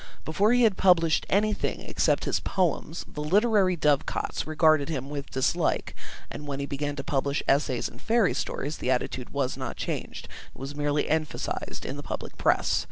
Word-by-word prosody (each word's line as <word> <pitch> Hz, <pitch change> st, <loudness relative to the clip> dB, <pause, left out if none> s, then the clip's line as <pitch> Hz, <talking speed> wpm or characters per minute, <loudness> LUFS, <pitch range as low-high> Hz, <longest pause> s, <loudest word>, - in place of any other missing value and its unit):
Before 200 Hz, +8 st, +2 dB
he 245 Hz, 0 st, +4 dB
had 215 Hz, -4 st, +4 dB
published 170 Hz, -4 st, +4 dB
anything 210 Hz, +2 st, +1 dB
except -, -, +1 dB
his -, -, +1 dB
Poems, 170 Hz, -3 st, -1 dB
the 150 Hz, -, -7 dB
literary 195 Hz, +3 st, +3 dB
dovecots 150 Hz, -1 st, 0 dB
regarded 155 Hz, -1 st, +3 dB
him 140 Hz, -3 st, -4 dB
with 140 Hz, -1 st, -5 dB
dislike, 130 Hz, 0 st, 0 dB, 0.4 s
and 145 Hz, -, -7 dB
when 140 Hz, -1 st, -3 dB
he 140 Hz, -, -2 dB
began 145 Hz, +1 st, -3 dB
to 140 Hz, -, -5 dB
publish 140 Hz, 0 st, -1 dB
essays 135 Hz, -3 st, +2 dB
and -, -, -13 dB
fairy 225 Hz, -4 st, +3 dB
stories, 150 Hz, +2 st, -3 dB
the -, -, -2 dB
attitude 125 Hz, -1 st, -1 dB
was 135 Hz, -2 st, -2 dB
not 130 Hz, -3 st, -5 dB
changed; -, -, -4 dB, 0.3 s
it -, -, -15 dB
was 135 Hz, +2 st, -5 dB
merely 145 Hz, 0 st, 0 dB
emphasised 155 Hz, 0 st, -2 dB
in 135 Hz, -, -4 dB
the -, -, -5 dB
public -, -, -6 dB
press. -, -, +2 dB
150 Hz, 175 wpm, -27 LUFS, 140-180 Hz, 0.4 s, he